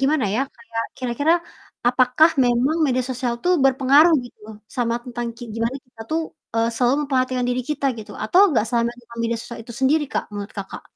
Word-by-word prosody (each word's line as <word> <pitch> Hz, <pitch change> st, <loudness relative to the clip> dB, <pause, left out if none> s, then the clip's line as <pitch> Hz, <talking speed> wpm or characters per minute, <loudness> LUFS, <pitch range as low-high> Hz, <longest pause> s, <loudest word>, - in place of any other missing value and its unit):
gimana 280 Hz, -2 st, +2 dB
ya, 235 Hz, -, +1 dB, 0.2 s
kayak, 230 Hz, -1 st, -4 dB
kira-kira 255 Hz, +5 st, +1 dB, 0.6 s
apakah 255 Hz, +6 st, +4 dB
memang 245 Hz, +6 st, +2 dB
media 255 Hz, -2 st, +1 dB
sosial 250 Hz, -1 st, -2 dB
tuh 360 Hz, -, +4 dB
berpengaruh, 275 Hz, +5 st, +5 dB
gitu, 245 Hz, -, -15 dB, 0.4 s
sama 235 Hz, -2 st, 0 dB
tentang 240 Hz, -1 st, -4 dB
kayak 240 Hz, -1 st, -9 dB
gimana 230 Hz, +3 st, -1 dB
kita 245 Hz, -2 st, -18 dB
tuh, 320 Hz, +1 st, +1 dB, 0.3 s
eee, 230 Hz, 0 st, +2 dB
selalu 245 Hz, +2 st, +3 dB
memperhatikan 255 Hz, -2 st, 0 dB
diri 250 Hz, 0 st, 0 dB
kita 290 Hz, -1 st, -1 dB
gitu, 215 Hz, -, -9 dB
atau 350 Hz, -, +4 dB
nggak 235 Hz, -8 st, +2 dB
selamanya 235 Hz, +1 st, -1 dB, 0.2 s
media 230 Hz, 0 st, 0 dB
sosial 235 Hz, -, -9 dB
itu 235 Hz, -, -10 dB
sendiri, 295 Hz, +3 st, +3 dB
Kak, -, -, -1 dB
menurut 205 Hz, 0 st, -6 dB
Kakak? 195 Hz, -, -7 dB
250 Hz, 180 wpm, -22 LUFS, 235-270 Hz, 0.6 s, berpengaruh